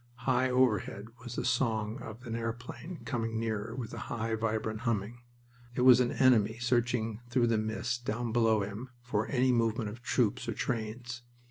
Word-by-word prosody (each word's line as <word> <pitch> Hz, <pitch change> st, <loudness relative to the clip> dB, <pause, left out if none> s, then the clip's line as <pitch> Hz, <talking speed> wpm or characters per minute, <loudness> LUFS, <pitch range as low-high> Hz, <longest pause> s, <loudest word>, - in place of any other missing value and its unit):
High 130 Hz, 0 st, +3 dB
overhead 115 Hz, -4 st, +1 dB
was 120 Hz, -1 st, -6 dB
the -, -, -2 dB
song 110 Hz, -1 st, 0 dB
of 115 Hz, +3 st, -9 dB
an 115 Hz, -1 st, -3 dB
airplane 120 Hz, +9 st, -5 dB
coming 115 Hz, -3 st, -1 dB
nearer, 115 Hz, 0 st, -2 dB
with 120 Hz, -4 st, -5 dB
a -, -, -5 dB
high, 115 Hz, 0 st, -2 dB
vibrant 110 Hz, -1 st, -1 dB
humming. 115 Hz, 0 st, -2 dB, 0.5 s
It 125 Hz, -, 0 dB
was 125 Hz, -1 st, +8 dB
an 125 Hz, -1 st, +2 dB
enemy 115 Hz, -4 st, +4 dB
searching 120 Hz, -2 st, 0 dB
through 120 Hz, -1 st, +3 dB
the 115 Hz, -2 st, +2 dB
mist 115 Hz, +3 st, -2 dB
down 120 Hz, 0 st, -2 dB
below 110 Hz, -2 st, +3 dB
him 105 Hz, +6 st, -6 dB
for 110 Hz, -3 st, -1 dB
any 130 Hz, -1 st, +3 dB
movement 115 Hz, -2 st, +1 dB
of 115 Hz, +3 st, -10 dB
troops 120 Hz, -4 st, +1 dB
or -, -, 0 dB
trains. 120 Hz, 0 st, -3 dB
115 Hz, 170 wpm, -31 LUFS, 110-125 Hz, 0.5 s, was